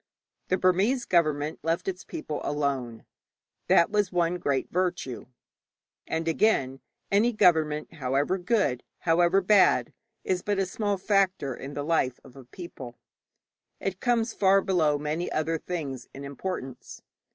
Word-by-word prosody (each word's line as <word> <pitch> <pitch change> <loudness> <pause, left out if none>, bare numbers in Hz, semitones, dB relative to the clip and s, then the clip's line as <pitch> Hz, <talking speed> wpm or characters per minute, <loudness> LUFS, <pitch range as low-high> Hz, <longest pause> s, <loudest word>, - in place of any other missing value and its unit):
The 185 - +1
Burmese 195 +8 +2
government 155 -3 +1
left 165 +4 -1
its 185 -1 -3
people 310 - -5
alone; 135 -6 -2 0.6
that 170 - +4
was 210 -3 +1
one 175 0 0
great 140 -4 -1
virtue. 175 -8 -2 0.8
And, 160 0 -2
again, 145 -7 +1 0.3
any 210 +5 +4
government, 160 -6 +2
however 145 +5 0
good, 180 - +1 0.2
however 175 +3 +3
bad, 195 +1 +4 0.3
is 185 -1 -1
but 205 +1 -1
a 195 - +1
small 205 +2 -2
factor 190 - +1
in 140 +2 -8
the 145 - -3
life 145 -5 0
of 125 - -16
a 135 -2 -12
people; 130 -5 -10 0.8
it 190 -1 -3
comes 235 -2 +1
far 195 0 +4
below 160 -7 +2
many 150 +4 -3
other 160 +1 -1
things 140 -9 -5
in 140 - -8
importance. 140 -2 -6
170 Hz, 140 wpm, -27 LUFS, 145-190 Hz, 0.8 s, that